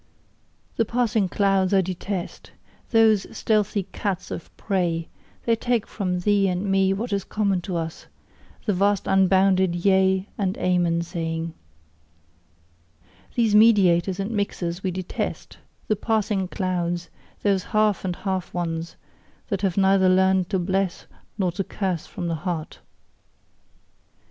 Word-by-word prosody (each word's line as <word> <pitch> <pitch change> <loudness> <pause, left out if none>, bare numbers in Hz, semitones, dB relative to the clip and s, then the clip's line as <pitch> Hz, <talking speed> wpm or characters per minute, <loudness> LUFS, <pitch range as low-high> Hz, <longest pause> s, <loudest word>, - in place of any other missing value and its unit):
The - - +4
passing 225 -4 0
clouds 195 -1 +2
I 190 - +5
detest 185 +1 -5 0.4
those 220 -3 +4
stealthy 210 -2 +1
cats 190 -3 -3
of - - -6
prey: 175 -5 -1 0.4
they 230 - +3
take 240 -1 0
from 180 -3 -2
thee 200 0 +3
and 180 +1 -1
me 195 -1 +2
what 210 +3 -2
is 200 -1 0
common 200 -4 0
to 175 0 -3
us 165 -1 -5 0.6
the 210 - +1
vast 200 +2 +1
unbounded 190 -1 +3
Yea 190 +1 +2
and 190 -2 0
Amen 175 -2 +1
saying. 165 -1 -4 1.8
These 230 -3 +2
mediators 195 -4 +5
and 195 +3 -2
mixers 190 -4 -2
we 190 - -1
detest 185 0 -5 0.3
the 215 - +2
passing 210 -3 0
clouds: 175 -2 -2 0.3
those 195 -3 +1
half 215 -2 +1
and 180 -2 -2
half 190 -1 -3
ones, 165 -1 -3 0.5
that 200 -4 -1
have 195 -3 0
neither 190 -1 +4
learned 190 0 +3
to 190 - +1
bless 190 0 -1 0.3
nor 185 -4 +1
to 185 +3 -3
curse 185 -4 -3
from 175 - -6
the 170 - -1
heart. 175 -4 -4
190 Hz, 135 wpm, -24 LUFS, 180-200 Hz, 1.8 s, I